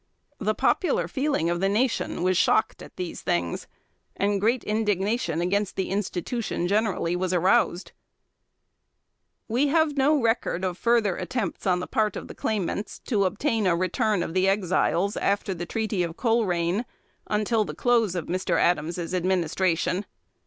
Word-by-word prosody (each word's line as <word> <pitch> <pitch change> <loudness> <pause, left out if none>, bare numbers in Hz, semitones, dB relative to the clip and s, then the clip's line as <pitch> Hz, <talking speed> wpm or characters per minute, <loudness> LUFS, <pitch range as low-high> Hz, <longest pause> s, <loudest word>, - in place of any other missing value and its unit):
The - - 0
popular 275 - +1
feeling 270 - 0
of 175 - -1
the 195 +1 +1
nation 230 -3 0
was 185 0 +2
shocked 220 - +2
at - - -12
these 180 -2 -5
things, 85 -1 -2 0.5
and 200 0 0
great 235 +3 +2
indignation 210 -4 0
against 200 +3 0
the 190 - -2
institution, 200 0 -2
generally, 200 -4 0
was 185 0 -1
aroused. 185 +1 +2 1.6
We 250 +6 +2
have 310 -1 +2
no 290 +2 +4
record 225 -6 0
of 180 -1 -2
further 230 -5 +2
attempts 195 0 -3
on 180 -1 +2
the - - -3
part 215 -4 0
of - - -6
the - - -9
claimants 205 -1 -2
to 205 -6 +1
obtain 210 +2 0
a 175 - +3
return 185 +2 0
of 165 - -5
the 185 +1 +2
Exiles, 195 0 +1
after 200 -1 0
the 175 -1 -6
Treaty 215 -3 -1
of 170 -1 -3
Colerain, 205 -4 +1 0.4
until 215 +1 +1
the - - -7
close 230 -6 +2
of 175 - -2
Mr. 185 +2 -1
Adams's 170 +1 0
administration. 180 +1 0
195 Hz, 150 wpm, -25 LUFS, 180-225 Hz, 1.6 s, no